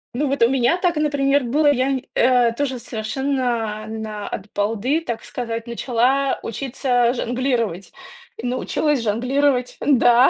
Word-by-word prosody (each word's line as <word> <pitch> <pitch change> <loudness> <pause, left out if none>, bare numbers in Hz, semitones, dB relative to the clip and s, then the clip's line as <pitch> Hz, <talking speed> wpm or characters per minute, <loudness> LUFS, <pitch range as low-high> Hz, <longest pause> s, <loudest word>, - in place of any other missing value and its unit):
Ну, 290 +4 0
вот 275 -3 +1
у 230 - +5
меня 265 +5 +2
так, 355 -3 0
например, 285 -2 +2
было. 290 +5 +3
Я 260 -1 +1
нь 265 -1 -1
э 245 -1 +4
тоже 260 0 -2
совершенно 235 -2 -2
на 215 -2 -5
от 205 +1 -6
балды, 225 +9 0
так 235 -8 -5
сказать, 230 -1 -5
начала 250 +3 +1
учиться 245 0 0
жонглировать. 240 -7 -2 0.4
И 225 - -7
научилась 255 +3 0
жонглировать, 250 +4 +1
да, 250 -2 +5
250 Hz, 140 wpm, -21 LUFS, 230-275 Hz, 0.4 s, у